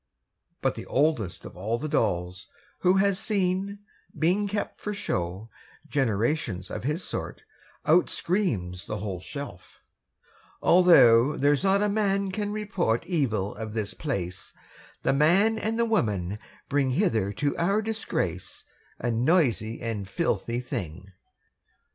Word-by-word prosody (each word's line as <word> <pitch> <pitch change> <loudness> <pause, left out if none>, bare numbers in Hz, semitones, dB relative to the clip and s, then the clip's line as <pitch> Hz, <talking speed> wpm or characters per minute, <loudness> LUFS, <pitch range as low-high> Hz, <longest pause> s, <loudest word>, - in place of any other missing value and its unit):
But - - +2
the - - -8
oldest 120 - 0
of - - -10
all 105 +6 -2
the 155 - -4
dolls 90 - -1 0.3
Who 180 +1 +4
had 195 0 +3
seen, 195 0 -1 0.4
being 180 +7 +2
kept 205 +1 -4
for 210 0 -3
show, 95 - -3 0.4
Generations 115 - -1
of 105 - -5
his 150 +6 -1
sort, - - -5 0.4
Out 170 +4 +4
screams 100 - -1
the 105 - -3
whole 100 -3 -4
shelf: 95 -1 -9 0.8
'Although 150 -8 +6
There's 145 +3 +2
not 195 +1 +3
a - - +3
man 200 -2 +1
can 205 +1 -2
report 200 - -1
Evil 115 - 0
of 110 -1 -6
this 110 -3 -2
place, 95 - -4 0.5
The - - +2
man 190 +10 +4
and 220 +1 -1
the 235 - +3
woman 105 - 0 0.3
bring 140 -2 +1
Hither 115 - +1
to 145 +7 -1
our 200 +5 +1
disgrace, 150 - -2 0.3
A 120 - -1
noisy 120 -3 +1
and 105 -4 -3
filthy 115 +5 -1
thing.' 95 -6 -6
140 Hz, 135 wpm, -27 LUFS, -, 0.8 s, Although